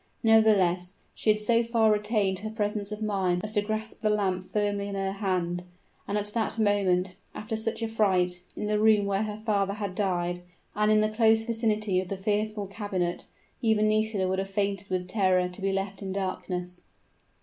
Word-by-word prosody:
Nevertheless, 195 -5 +4 0.2
she - - -1
had 215 0 +4
so 230 +2 +3
far 230 -2 +3
retained 210 -3 +1
her 215 +2 -5
presence 210 -1 -2
of 210 +1 -4
mind 190 -4 0
as 215 0 -4
to 205 - +3
grasp 215 +1 -4
the 215 - +2
lamp 190 -3 0
firmly 205 -1 0
in 200 - -4
her 195 0 -1
hand, 185 -3 -1 0.5
for 205 - -1
at 205 - -1
that 225 -1 -1
moment, 190 -4 +1 0.2
after 215 +1 -4
such 225 +1 -3
a - - 0
fright, 185 -5 +1
in - - -3
the 210 0 +1
room 215 -1 +4
where 200 0 0
her 210 -1 -3
father 200 -3 +1
had 205 -3 -4
died, 175 -3 -1 0.3
and 210 +1 +2
in 215 0 +5
the 215 - +2
close 220 0 +3
vicinity 215 -4 0
of 185 - -7
the 195 - -4
fearful 210 +1 -1
cabinet, 195 -3 -3 0.3
even 220 -2 +3
Nisida 215 -3 +1
would 190 +1 0
have 195 0 -3
fainted 200 -1 -1
with 180 -1 -2
terror 185 -2 +2
to 180 +2 -9
be 195 0 +1
left 195 +1 -3
in 195 -1 -4
darkness. 180 -2 -3
205 Hz, 195 wpm, -27 LUFS, 190-215 Hz, 0.5 s, in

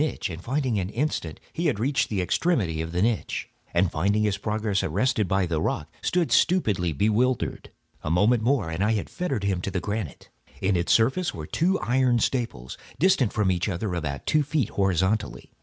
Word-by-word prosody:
In 125 - -1
an 90 0 -2
instant 115 - -2
he 170 +1 0
had 125 -9 0
reached 140 +5 +1
the 95 -4 0
extremity 95 - 0
of 80 0 -5
the 90 +2 0
niche, 115 -1 -1 0.2
and 85 0 +2
finding 100 +6 +1
his 100 -2 0
progress 105 -2 -1
arrested 105 +4 +1
by 95 +1 +1
the 80 -3 -1
rock, - - -2
stood 175 -2 0
stupidly 105 - +2
bewildered. 110 - 0 0.3
A - - -4
moment 105 +8 +3
more 115 -8 +1
and 80 +4 -1
I 110 +2 +2
had 105 - -3
fettered 140 - -2
him 95 -3 0
to 95 - -3
the 95 -1 -2
granite. 100 -4 -5 0.3
In 95 0 +1
its 85 -1 0
surface 130 +11 +2
were 80 - -6
two 180 - +1
iron 125 0 +2
staples, 115 - -2 0.2
distant 150 - +3
from 105 -3 +1
each 90 +2 -1
other 95 +1 -2
about 70 -6 -3
two 155 - +3
feet, 145 -5 0
horizontally. 95 +2 0
105 Hz, 185 wpm, -25 LUFS, 90-130 Hz, 0.3 s, moment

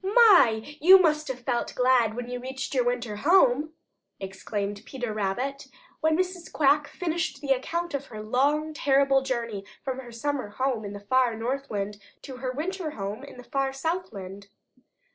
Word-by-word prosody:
"My, 385 - +6 0.2
you 375 +4 +9
must 305 -3 +2
have 255 -2 -5
felt 240 -1 -2
glad 250 -3 +3
when 245 0 -5
you 250 0 -4
reached 265 +2 -5
your 255 -2 +2
winter 240 -3 -2
home!" 305 - +3 0.5
exclaimed 200 +1 -4
Peter 245 -5 -5
Rabbit 245 +8 -2 0.3
when 315 0 +2
Mrs. 365 -2 -3
Quack 290 0 +3
finished 345 -1 -3
the 280 -2 -3
account 335 +6 -3
of 280 0 -3
her 215 -2 -8
long, 290 +7 +1
terrible 275 -2 +3
journey 235 -6 -3 0.2
from 265 -1 -3
her 245 -2 -9
summer 255 -1 -3
home 255 +1 -1
in 200 - -6
the 205 - -7
far 245 +3 +2
Northland 220 -4 -3 0.2
to 265 -2 -8
her 255 0 -3
winter 335 +5 -3
home 205 +5 -4
in 280 - -11
the 250 - -10
far 270 +2 -1
Southland. 210 - -4
260 Hz, 165 wpm, -26 LUFS, 225-300 Hz, 0.5 s, you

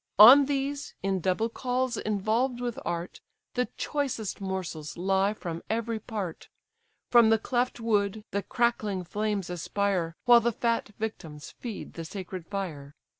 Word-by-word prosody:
On 255 +8 +10
these, 280 0 -2
in 195 -1 +1
double 185 +6 +1
cauls 250 +1 -1
involved 220 +5 0
with 240 -2 -3
art, 175 0 -4 0.3
The 250 0 0
choicest 265 -10 -2
morsels 180 -6 -4
lie 195 +3 +2
from 170 -4 -5
every 230 0 -1
part, 205 -6 -5 0.6
From 235 -2 +7
the 225 - +5
cleft 245 +3 -1
wood 210 -2 0
the 200 - 0
crackling 215 -4 0
flames 205 +1 -2
aspire 180 -1 -1
While 240 -1 +8
the 235 +1 +1
fat 230 -1 0
victims 160 -9 -6
feed 230 -5 -7
the 165 - -6
sacred 185 -1 -7
fire. 155 -8 -5
210 Hz, 140 wpm, -28 LUFS, 185-235 Hz, 0.6 s, On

